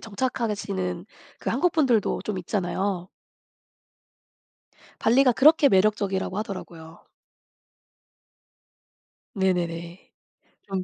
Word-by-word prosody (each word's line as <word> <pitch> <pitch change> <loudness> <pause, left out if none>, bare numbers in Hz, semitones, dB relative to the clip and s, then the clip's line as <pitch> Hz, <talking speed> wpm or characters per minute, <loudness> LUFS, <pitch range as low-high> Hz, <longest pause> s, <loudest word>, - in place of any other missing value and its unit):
정착하시는 200 -5 -3 0.3
그 - - -5
한국분들도 285 - +1
좀 210 - -4
있잖아요. 185 0 -2 1.9
발리가 250 +2 +4
그렇게 295 +3 +5
매력적이라고 195 -1 +1
하더라고요. 170 -5 -8 2.3
네네네. 175 -2 -2 0.6
좀 190 -1 -3
195 Hz, 205 characters per minute, -25 LUFS, 180-225 Hz, 2.3 s, 그렇게